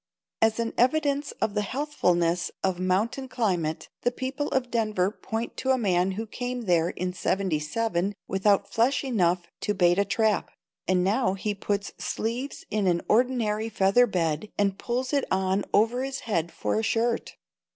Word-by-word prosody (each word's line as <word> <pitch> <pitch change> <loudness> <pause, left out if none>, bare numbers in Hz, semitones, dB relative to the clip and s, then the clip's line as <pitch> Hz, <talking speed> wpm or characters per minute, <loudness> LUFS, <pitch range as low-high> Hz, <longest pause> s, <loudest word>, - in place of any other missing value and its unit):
As 225 0 +3
an 230 0 -1
evidence 285 +2 +2
of 220 -2 -2
the 210 - +1
healthfulness 180 - 0
of 185 -2 0
mountain 200 +9 0
climate, 180 -11 -1
the - - +2
people 265 +3 -3
of 255 -2 -1
Denver 215 -5 +1
point 225 +1 -5
to 265 - -2
a 260 - +4
man 190 -4 +1
who 220 +4 -4
came 245 +2 -4
there 175 -5 +2
in 180 0 -3
'77 185 +2 -1
without 195 +1 +2
flesh 245 +6 +2
enough 180 -9 +1 0.2
to 210 - -1
bait 175 0 +4
a - - +5
trap, 215 +1 +1 0.4
and 185 -1 +3
now 195 0 +2
he 205 +2 -2
puts 200 0 -2
sleeves 240 +5 -3
in 210 -3 +1
an 170 -1 +2
ordinary 225 -2 +1
feather 210 +4 +4
bed 165 -1 -1
and 200 -1 +1
pulls 250 +3 -2
it 280 - +3
on 190 +1 +1
over 235 +4 +3
his 270 0 -4
head 170 -7 -1
for - - -1
a - - -2
shirt. 230 +1 0
210 Hz, 165 wpm, -26 LUFS, 185-245 Hz, 0.4 s, a